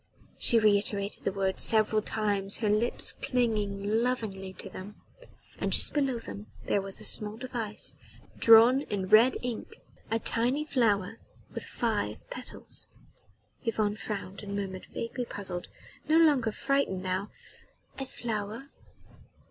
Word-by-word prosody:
She 235 - +4
reiterated 205 -1 +1
the - - +1
words 190 -1 -1
several 215 -1 +5
times, 205 -2 0
her 215 -2 0
lips 220 +3 +1
clinging 215 -3 -1
lovingly 215 -6 -2
to - - -7
them 195 +2 -10 0.6
and - - -1
just - - +7
below 275 -4 +1
them 100 - -9 0.2
there 200 - +1
was 195 0 -7
a - - -9
small 210 0 0
device, 235 -4 -3 0.4
drawn 230 +4 +7
in 195 -8 -4
red 225 +5 +6
ink... 245 -2 -5 0.3
a 225 - +1
tiny 245 +6 0
flower 225 -6 +1 0.3
with - - -6
five - - -2
petals.... - - -6 0.8
Yvonne 215 -3 0
frowned 200 -3 -6
and 200 -1 -6
murmured, 190 -2 -5
vaguely 240 +2 -4
puzzled 190 -5 -6 0.4
no 315 - +5
longer 290 -9 +4
frightened 270 -7 -1
now: 185 +2 -2 0.7
"A 270 - -4
flower 225 +2 -5
215 Hz, 130 wpm, -29 LUFS, 200-240 Hz, 0.8 s, just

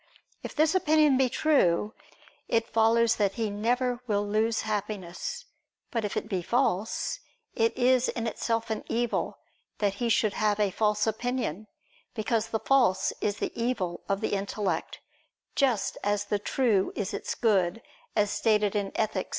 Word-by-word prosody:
If - - -7
this 310 +2 +3
opinion 310 -5 +4
be 260 -1 +3
true, 215 - +2 0.5
it 230 0 +1
follows 225 0 +3
that 200 -2 +1
he 220 -2 -2
never 245 +4 0
will 205 -2 +1
lose 215 +2 +1
happiness: 210 - -4 0.5
but 230 -2 -1
if 205 - -3
it - - -2
be 190 -4 -1
false, 225 - 0 0.3
it 225 0 +1
is 255 0 +3
in 230 -2 -3
itself 230 0 -2
an 220 - -2
evil 235 0 -1 0.4
that 205 -2 +1
he 235 - +1
should 215 -2 +2
have 210 -1 +1
a 205 -2 +2
false 210 +1 +1
opinion: 220 -4 -2 0.5
because 225 0 0
the 225 - -1
false 240 -9 +2
is 205 -1 0
the - - -2
evil 230 -7 -2
of 195 0 0
the - - -1
intellect, 195 -3 -2 0.6
just 255 -7 +1
as 205 0 0
the 205 0 -1
true 210 -3 +1
is 205 -3 -3
its - - -3
good, 200 -2 +1 0.3
as 205 -1 +2
stated 210 -2 +2
in 200 -1 0
_Ethic. 210 -3 -1
220 Hz, 160 wpm, -28 LUFS, 205-240 Hz, 0.6 s, opinion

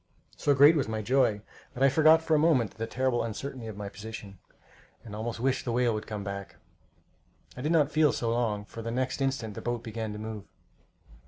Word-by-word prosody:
So 145 - +2
great 145 +4 +7
was 140 -6 0
my 110 -1 -3
joy 120 -3 +2 0.3
that 130 - 0
I 135 - +7
forgot 155 +3 +5
for 160 - 0
the 155 - +5
moment 145 -9 +3
the 115 0 -5
terrible 130 0 0
uncertainty 115 +2 -5
of 110 -2 -7
my 105 -1 -5
position, 105 -2 -9 0.7
and 105 -2 -8
almost 115 +2 -4
wished 130 +2 0
the 120 - -2
whale 120 -1 +2
would 110 0 -4
come 105 -2 -5
back. 100 0 -6 1.0
I 125 - -7
did 150 +4 -1
not 155 -3 +3
feel 155 -2 +4
so 115 -1 -1
long, 110 -4 -1
for 115 - -9
the 115 - -4
next 130 +3 -2
instant 130 -5 -1
the - - -7
boat 120 -1 -3
began 110 -1 -4
to - - -6
move. 110 -2 -6
115 Hz, 215 wpm, -28 LUFS, 110-135 Hz, 1.0 s, great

